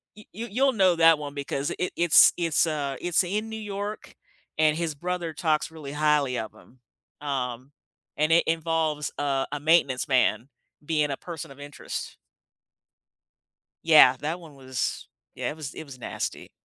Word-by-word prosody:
you 210 Hz, -, -14 dB
you 230 Hz, +4 st, -6 dB
you'll 265 Hz, +5 st, +3 dB
know 190 Hz, -5 st, +4 dB
that 165 Hz, -1 st, +6 dB
one 145 Hz, -1 st, -6 dB
because 140 Hz, 0 st, -3 dB
it, 180 Hz, -, -1 dB
it's 170 Hz, -2 st, +6 dB
it's, 165 Hz, -1 st, +2 dB
uh, 145 Hz, -3 st, -2 dB
it's 175 Hz, +1 st, +2 dB
in 210 Hz, +5 st, -3 dB
New 220 Hz, 0 st, -6 dB
York 205 Hz, 0 st, -6 dB, 0.4 s
and 155 Hz, 0 st, +3 dB
his 165 Hz, -2 st, -2 dB
brother 175 Hz, +1 st, -3 dB
talks 155 Hz, -1 st, 0 dB
really 155 Hz, -4 st, -8 dB
highly 150 Hz, -4 st, +2 dB
of 110 Hz, -1 st, -6 dB
him, 130 Hz, -, -20 dB, 0.4 s
um, 130 Hz, -2 st, -4 dB, 0.5 s
and 155 Hz, +1 st, +1 dB
it 165 Hz, -, +5 dB
involves, 160 Hz, -2 st, 0 dB
uh, 140 Hz, -2 st, 0 dB
a 145 Hz, -, -3 dB
maintenance 145 Hz, -4 st, +2 dB
man 130 Hz, -2 st, +2 dB, 0.4 s
being 150 Hz, -2 st, +1 dB
a 135 Hz, -, -3 dB
person 165 Hz, -5 st, -8 dB
of 135 Hz, -, -14 dB
interest. 145 Hz, 0 st, -7 dB, 1.7 s
Yeah, 155 Hz, -6 st, +7 dB
that 160 Hz, +4 st, -3 dB
one 160 Hz, -4 st, -14 dB
was 130 Hz, -2 st, -3 dB, 0.3 s
yeah, -, -, -3 dB
it -, -, -6 dB
was 150 Hz, -4 st, -7 dB
it -, -, -7 dB
was 140 Hz, -4 st, -12 dB
nasty. -, -, -5 dB
155 Hz, 165 wpm, -26 LUFS, 140-170 Hz, 1.7 s, Yeah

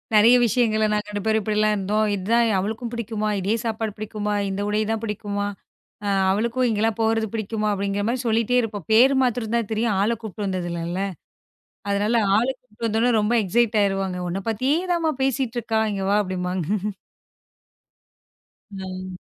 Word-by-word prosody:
நிறைய 225 Hz, +4 st, +7 dB
விஷயங்கள 220 Hz, -2 st, +2 dB
நாங்க 210 Hz, 0 st, -1 dB
2 205 Hz, -1 st, -4 dB
பேரும் 220 Hz, 0 st, +2 dB
இப்படி 210 Hz, +1 st, -1 dB
எல்லாம் 215 Hz, 0 st, +3 dB
இருந்தோம். 210 Hz, +2 st, 0 dB
இது 195 Hz, -2 st, -3 dB
தான் 235 Hz, 0 st, +4 dB
அவளுக்கும் 220 Hz, +4 st, -3 dB
பிடிக்குமா, 220 Hz, -2 st, -2 dB
இதே 205 Hz, +4 st, +1 dB
சாப்பாடு 220 Hz, -1 st, -2 dB
பிடிக்குமா, 210 Hz, -1 st, -3 dB, 0.2 s
இந்த 195 Hz, +1 st, -3 dB
உடை 210 Hz, +1 st, +1 dB
தான் 225 Hz, -1 st, -1 dB
பிடிக்குமா, 205 Hz, -1 st, -3 dB, 0.6 s
அ, -, -, -1 dB, 0.2 s
அவளுக்கும் 235 Hz, +5 st, +1 dB
இங்க 215 Hz, -2 st, -1 dB
எல்லாம் 225 Hz, 0 st, 0 dB
போறது 225 Hz, 0 st, +1 dB
பிடிக்குமா 215 Hz, -1 st, -2 dB
அப்படிங்கற 200 Hz, 0 st, -1 dB
மாதிரி 245 Hz, +2 st, -1 dB
சொல்லிட்டே 230 Hz, +2 st, +2 dB
இருப்பேன். 205 Hz, -6 st, -5 dB
பேரு 260 Hz, +5 st, +6 dB
மாத்திரம் 235 Hz, -2 st, 0 dB
தான் 230 Hz, -3 st, 0 dB
தெரியும். 220 Hz, -1 st, +1 dB
ஆளக் 225 Hz, +2 st, 0 dB
கூட்டிட்டு 210 Hz, -2 st, -5 dB
வந்தது 185 Hz, -2 st, -2 dB, 0.2 s
இல்ல. 180 Hz, +2 st, -2 dB, 0.9 s
அதனால 205 Hz, +3 st, +1 dB, 0.2 s
ஆளக் 255 Hz, +3 st, 0 dB
கூட்டிட்டு 230 Hz, -2 st, -8 dB
வந்தா 225 Hz, +3 st, +2 dB
ரொம்ப 210 Hz, +3 st, +1 dB
எக்ஸ்சைட் 225 Hz, +3 st, +2 dB
ஆயிடுவாங்க. 195 Hz, -2 st, 0 dB
உன்ன 185 Hz, +3 st, -3 dB
பத்தியே 260 Hz, +8 st, +1 dB, 0.2 s
தான் 340 Hz, -, -1 dB
மா 315 Hz, -, +3 dB
பேசிட்டு 265 Hz, -2 st, -1 dB
இருக்கா. 220 Hz, 0 st, 0 dB
இங்க 195 Hz, -1 st, -3 dB
வா -, -, +4 dB
அப்படிம்பாங்க. 180 Hz, -2 st, -3 dB, 2.1 s
ம். 185 Hz, -1 st, -6 dB
215 Hz, 170 wpm, -23 LUFS, 200-230 Hz, 2.1 s, நிறைய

